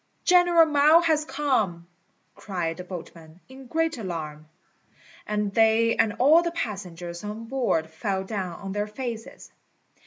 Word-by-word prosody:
"General 350 -2 +5
Mao 305 +2 +5
has 315 -3 +2
come," 225 - -1 0.5
cried 175 -5 -4
the 180 - -7
boatmen, 170 -2 -10
in 265 0 -13
great 325 0 -1
alarm; 155 -6 -6 0.8
and 210 -1 -1
they 225 +1 +3
and 225 -2 +2
all 295 +7 +6
the 345 - -1
passengers 180 - -6
on 210 +2 -6
board 230 -10 0
fell 190 +4 -3
down 190 -3 -5
on 195 -1 -6
their 205 +1 -2
faces. 225 0 -7
215 Hz, 135 wpm, -25 LUFS, 180-275 Hz, 0.8 s, all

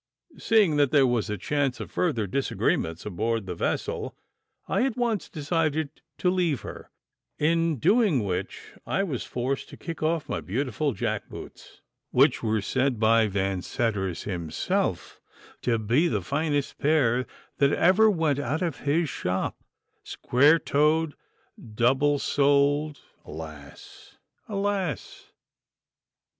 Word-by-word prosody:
Seeing 205 -9 +3
that 145 -2 +4
there 140 -1 +5
was 120 -4 0
a 105 - -2
chance 135 +4 -1
of - - -7
further 135 -12 0
disagreements 90 -7 -1
aboard 110 +2 -1
the 90 - -4
vessel, 85 - -3 0.5
I 200 - +1
at 265 -3 -1
once 235 -4 -1
decided 155 -1 -1 0.2
to 180 - +2
leave 175 -8 0
her, - - -9 0.5
in 165 0 +1
doing 195 - +3
which 95 -1 -4 0.2
I 195 - +1
was 145 - -3
forced 130 +3 -3
to - - -11
kick 165 -1 -7
off 155 -1 0
my - - -3
beautiful 135 +6 -1
jack 95 - -3
boots, - - -11 0.3
which 135 +2 +3
were 110 -2 0
said 130 -1 0
by 115 0 +4
Vanseddars 95 0 -2
himself 85 -5 -2 0.4
to 120 -2 +1
be 120 +11 +2
he - - -1
finest 145 -1 -1
pair 130 -5 +2 0.3
that 140 0 +4
ever 200 +8 +5
went 160 -7 +1
out 145 +5 -1
of 165 -5 -2
his 155 +4 +1
shop, 90 -7 -3 0.4
square 145 +6 +3
toed, 155 +1 +1 0.6
double 135 +5 +3
soled 145 +1 +2 0.2
alas! 75 -2 -11 0.3
alas! 195 - -3
140 Hz, 125 wpm, -26 LUFS, 115-160 Hz, 0.6 s, there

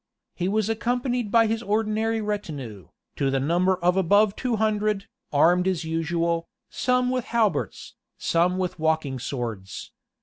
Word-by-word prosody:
He 180 - -2
was 215 +1 +1
accompanied 245 +1 -1
by 230 +1 +5
his 225 +1 -1
ordinary 220 +1 0
retinue, 145 - -5 0.3
to 140 - +1
the 135 0 +1
number 175 +7 +2
of 180 0 +1
above 200 +3 +4
two 250 -3 -1
hundred, 215 -2 0 0.3
armed 175 +5 +4
as 180 -3 0
usual, 165 +1 -1 0.2
some 250 0 +1
with 255 -2 -1
halberts, 215 -10 -1 0.2
some 175 +2 +1
with 180 -2 -3
walking 155 -4 0
swords. 115 -7 -5
190 Hz, 140 wpm, -25 LUFS, 160-220 Hz, 0.3 s, by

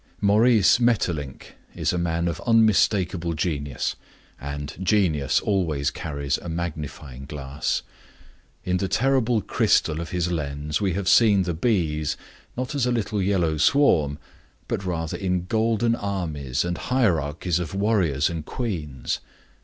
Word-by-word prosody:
Maurice 105 +2 +4
Maeterlinck 90 - -1 0.2
is - - 0
a 90 - 0
man 85 0 0
of 85 -1 -3
unmistakable 95 -6 +3
genius, 75 -4 -2 0.4
and 70 0 -5
genius 90 -8 +2
always 80 -9 0
carries 70 -2 -3
a 85 - -7
magnifying 75 -5 -5
glass. 70 0 -3 0.8
In 90 0 0
the 95 - -1
terrible 125 -1 +2
crystal 80 +1 +2
of 85 - -6
his 90 0 -1
lens 75 -1 -2
we 95 -3 +1
have 95 +1 -3
seen 105 -2 +5
the 90 -1 -2
bees 80 -6 0 0.4
not 130 +3 -3
as 135 -4 +1
a - - +1
little 110 -3 -1
yellow 90 -5 +1
swarm, 80 - +3 0.5
but - - -2
rather 80 -3 -3
in 90 -2 -1
golden 115 +3 +1
armies 80 - -2
and 85 0 -3
hierarchies 90 - 0
of 85 0 -4
warriors 95 -9 +2
and 85 -2 -4
queens. 75 - -3
85 Hz, 135 wpm, -24 LUFS, 75-105 Hz, 0.8 s, seen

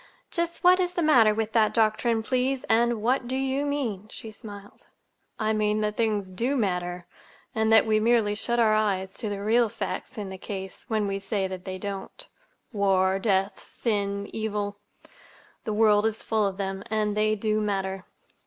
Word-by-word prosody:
"Just 340 0 -2
what 365 +1 +6
is 360 -1 0
the 345 - 0
matter 240 -9 +6
with 220 0 -2
that 220 -1 +3
doctrine, 225 0 +2
please, 255 +2 0
and 235 -1 +2
what 250 +1 +1
do 255 - -2
you 270 +2 0
mean?" 230 -9 -2
she 220 - -8
smiled. 205 -1 -12 0.5
"I 220 0 0
mean 215 0 +1
that 210 0 -1
things 210 -4 0
do 240 +9 -1
matter, 180 -4 -1 0.5
and 220 0 +1
that 220 - +6
we 215 -1 +3
merely 225 -2 +3
shut 235 +3 -1
our 220 -2 +4
eyes 195 -3 0
to 220 - -2
the 200 -1 -4
real 230 +2 +3
facts 255 - -5
in 205 -2 -4
the 190 0 -8
case 190 -1 -7
when 215 -2 0
we 195 0 -2
say 195 0 -1
that 185 -1 -7
they 185 -1 -4
don't. 200 - -5 0.5
War, 190 -2 +2
death, 195 -1 +1
sin, 200 -3 -2
evil—the 210 -2 -2 1.0
world 210 0 +4
is 220 0 -4
full 220 -2 +1
of 195 -1 -5
them, 195 0 -3
and 210 -1 0
they 215 0 +2
do 215 0 0
matter." 195 -2 -2
215 Hz, 180 wpm, -26 LUFS, 200-230 Hz, 1.0 s, what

